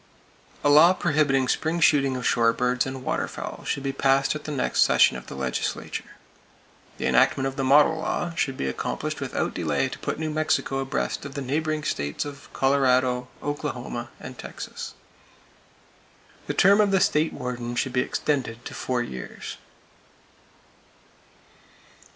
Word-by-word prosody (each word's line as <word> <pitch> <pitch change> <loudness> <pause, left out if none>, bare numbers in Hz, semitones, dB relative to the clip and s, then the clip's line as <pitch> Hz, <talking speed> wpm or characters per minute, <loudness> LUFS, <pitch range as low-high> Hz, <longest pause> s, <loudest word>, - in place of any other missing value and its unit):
A - - +3
law 160 +5 +8
prohibiting 150 -7 +2
spring 160 +6 0
shooting 140 -5 +3
of 125 - -5
shore 115 -3 +3
birds 125 +2 0
and 130 -1 -6
waterfowl - - -4
should 140 - -2
be 135 - -1
passed 135 0 +2
at 150 - -7
the 150 - -4
next 135 -4 0
session - - +5
of - - -8
the - - -8
legislature. 65 -2 -3 0.8
The - - -3
enactment 135 - +3
of 135 0 -2
the 135 - -2
"model 150 +4 +5
law" 170 +1 -2
should 135 -5 -1
be - - -2
accomplished 65 - -3
without - - -2
delay - - 0
to - - -8
put - - -3
New 155 0 -2
Mexico 155 -3 0
abreast 135 0 -2
of 140 0 -8
the 140 - -3
neighboring 155 +3 -1
states 75 - -2
of 145 0 -10
Colorado, 130 -2 +2 0.2
Oklahoma 125 -5 -4
and 125 0 -9
Texas. - - -7 1.5
The - - -2
term 200 +2 +6
of 205 - +3
the 195 -1 +3
State 155 -3 +2
Warden 125 -2 -5
should 125 +1 -1
be 125 - +3
extended 125 -5 -2
to - - -6
four 125 -2 -1
years. 65 - -7
135 Hz, 155 wpm, -25 LUFS, 125-150 Hz, 1.5 s, law